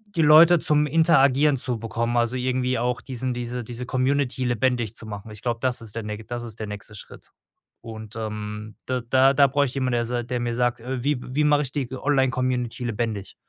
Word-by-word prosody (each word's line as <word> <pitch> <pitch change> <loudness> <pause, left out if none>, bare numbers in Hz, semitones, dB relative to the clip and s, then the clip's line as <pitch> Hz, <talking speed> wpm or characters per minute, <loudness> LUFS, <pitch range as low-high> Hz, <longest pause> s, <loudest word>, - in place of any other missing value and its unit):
die 165 - +2
Leute 160 +3 +7
zum 150 -1 +2
Interagieren 150 -2 +4
zu 125 -2 0
bekommen. 115 +2 -2
Also, 120 +1 +1
irgendwie 125 0 0
auch 120 +1 -1
diesen 130 -1 -4
diese 120 0 -4
diese 120 +2 -6
Community 130 0 0
lebendig 120 -2 0
zu 115 - -6
machen. 105 +1 -8
Ich 105 - -11
glaube, 120 -1 -2
das 125 -1 -1
ist 110 -2 -10
der 115 - -3
näch 105 +1 -6
das 120 0 -5
ist 115 -2 -7
der 110 - -4
nächste 105 +1 -8
Schritt. 100 - -12 0.5
Und, 110 -2 -9
ähm, 105 -1 -6
da 125 -1 -2
da 130 +3 +4
da 140 0 +5
bräuchte 140 0 +1
ich - - -13
jemanden, 130 -2 0
der 120 0 +1
sa 120 +1 -2
der 125 +1 -3
mir 120 -1 -2
sagt: 120 0 0
„Äh, 125 0 -4
wie 145 0 +1
wie 135 +5 -1
mache 150 0 +3
ich 130 - -6
die 135 -4 -2
g 130 - -7
Online-Community 130 -3 0
lebendig?” 110 -3 -3
125 Hz, 220 wpm, -24 LUFS, 115-130 Hz, 0.5 s, Leute